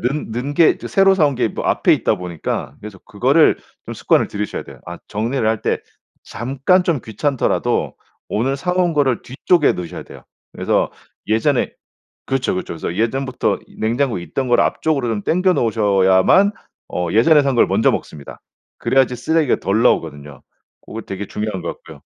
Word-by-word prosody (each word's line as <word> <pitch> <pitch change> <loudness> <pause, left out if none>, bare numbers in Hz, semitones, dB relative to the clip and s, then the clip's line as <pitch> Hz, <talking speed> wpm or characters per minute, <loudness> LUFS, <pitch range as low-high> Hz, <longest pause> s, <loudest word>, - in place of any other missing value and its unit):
넣은 135 -1 -4
게 165 +1 +4
새로 195 0 +4
사 165 -5 +3
온 140 -2 -2
게 120 -1 +1
뭐 - - -6
앞에 - - +3
있다 110 - 0
보니까 90 -3 -5
그래서 105 -2 -10
그거를 - - +3 0.3
좀 - - -6
습관을 - - +2
들이셔야 105 0 -4
돼요. - - -13
아 85 0 -7
정리를 115 +3 -2
할 110 -1 -1
때 - - 0 0.9
잠깐 185 +3 +5
좀 170 -7 0
귀찮더라도 125 +5 -1 0.3
오늘 130 +6 -1
사 180 +6 -2
온 180 -1 +1
거를 140 -6 +1
뒤쪽에 150 +5 +2
넣으셔야 90 -2 -6
돼요. - - -14 0.3
그래서 - - 0 0.4
예전에 115 +5 +1 0.5
그렇죠 135 -1 -1
그렇죠. 90 - -4
그래서 85 +1 -5
예전부터 125 +5 -1
이 - - -20
냉장고에 115 -2 0
있던 130 +9 -3
걸 120 - +4
앞쪽으로 145 -6 0
좀 110 -3 -2
당겨 185 +2 +2
놓으셔야만 105 - +3 0.4
어 90 -1 -3
예전에 145 - +5
산 135 -1 0
걸 - - +5
먼저 - - +2
먹습니다. 75 -2 -6 0.4
그래야지 130 -2 +2
쓰레기가 150 +3 +1
덜 105 +4 0
나오거든요. 75 - -1 0.4
고거 115 - -8
되게 100 0 -6
중요한 105 -4 -4
것 - - -4
같고요. - - -10
120 Hz, 370 characters per minute, -19 LUFS, 105-145 Hz, 0.9 s, 잠깐